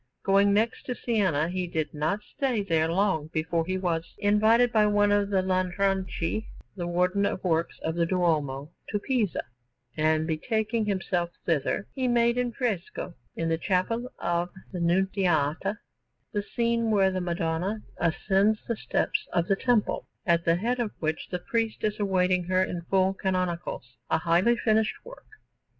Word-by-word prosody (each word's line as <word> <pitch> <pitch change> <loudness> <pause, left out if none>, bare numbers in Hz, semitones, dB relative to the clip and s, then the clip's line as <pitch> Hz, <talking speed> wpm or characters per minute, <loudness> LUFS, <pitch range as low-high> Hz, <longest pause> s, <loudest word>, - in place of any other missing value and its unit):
Going 200 +1 +4
next 220 +3 0
to 250 - -2
Siena, 190 -12 +1
he 180 0 -2
did 160 -2 -2
not 155 +7 -1
stay 255 -6 -1
there 165 -3 +1
long 185 -4 +1
before 160 +1 -1
he 185 0 0
was 170 -3 -2
invited 220 +4 +4
by 215 -2 +4
one 205 0 +3
of 205 -1 +2
the 190 -2 +2
Lanfranchi, 190 +1 0 0.3
the 175 -3 -4
Warden 180 +3 +1
of 195 - -1
Works 165 -2 0
of 160 - -1
the 170 0 +1
Duomo, 155 -5 0 0.2
to 210 - 0
Pisa; 220 -3 0 0.5
and 155 0 +2
betaking 220 +7 -1
himself 185 -3 -1 0.2
thither, 165 +4 0
he 260 -2 -1
made 235 0 +3
in 245 -1 0
fresco, 215 -8 -3 0.2
in 165 - -1
the 165 0 0
Chapel 230 +8 0
of 175 +1 -1 0.2
the 180 - -4
Nunziata, 180 0 +1 0.5
the 205 - -1
scene 230 +2 0
when 195 -3 +3
the 185 - -1
Madonna 175 +4 -2
ascends 195 +5 +2
the 235 - 0
steps - - -1
of 175 -1 +1
the 195 - +3
Temple, 235 0 +1 0.2
at 170 -1 +2
the 165 - +4
head 240 +7 -1
of 235 -3 0
which 160 0 -2
the 180 - -2
priest 225 +4 -2
is 215 0 -1
awaiting 185 -3 +2
her 185 +1 +2
in 175 -2 -3
full 190 0 +3
canonicals 180 - -3
a - - +3
highly 175 +8 +3
finished 220 -1 +2
work. - - -12
190 Hz, 165 wpm, -27 LUFS, 170-215 Hz, 0.5 s, Going